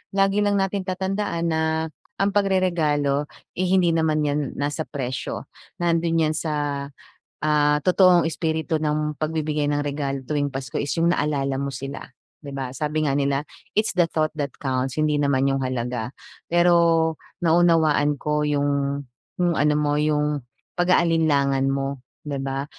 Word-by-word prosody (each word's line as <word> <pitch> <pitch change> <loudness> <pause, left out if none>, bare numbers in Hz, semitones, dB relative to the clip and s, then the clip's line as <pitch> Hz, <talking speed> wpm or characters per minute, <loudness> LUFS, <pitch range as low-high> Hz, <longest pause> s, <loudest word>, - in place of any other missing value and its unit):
lagi 195 +1 +3
lang 205 -1 +2
natin 195 0 -1
tatandaan 190 -2 -2
na 160 0 +1 0.5
ang 200 0 +1
pagreregalo, 160 -8 +1 0.3
eh, 185 - +1
hindi 180 -2 +3
naman 160 -2 +1
yan 145 0 +1 0.2
nasa 145 +2 -2
presyo, 130 -3 -5 0.3
nando'n 165 -2 +2
yan 155 - -1
sa, 145 -3 -2 0.6
ah, 150 -1 +3
totoong 180 -2 +5
espiritu 160 0 -1
ng 150 0 0
pagbibigay 155 -1 -1
ng 145 0 +1
regalo 140 -1 -2
tuwing 145 0 0
Pasko, 135 -2 -5
is 145 - -3
yung 170 +1 +3
naalala 140 -2 0
mo 140 - -2
sila, 135 +2 -6 0.4
'di 145 - -8
ba? 130 -2 -3
Sabi 155 +1 -1
nga 135 - +1
nila, 140 0 0 0.3
"It's 215 - +2
the 175 -2 +3
thought 155 -1 0
that 145 -2 -2
counts", 130 -1 -2
hindi 155 -1 +2
naman 140 -2 +2
yung 135 0 +1
halaga. 125 -2 -2 0.4
Pero 170 -2 +4 0.3
naunawaan 160 -3 +3
ko 150 0 0
yung 140 -1 0 0.3
yung 175 -1 +2
ano 150 0 +2
mo, 145 -1 +1
yung 150 -1 +1 0.4
pag-aalinlangan 155 -6 +3
mo, 135 0 -2 0.3
'di 140 -2 -3
ba. 135 0 -2
150 Hz, 145 wpm, -23 LUFS, 140-165 Hz, 0.6 s, totoong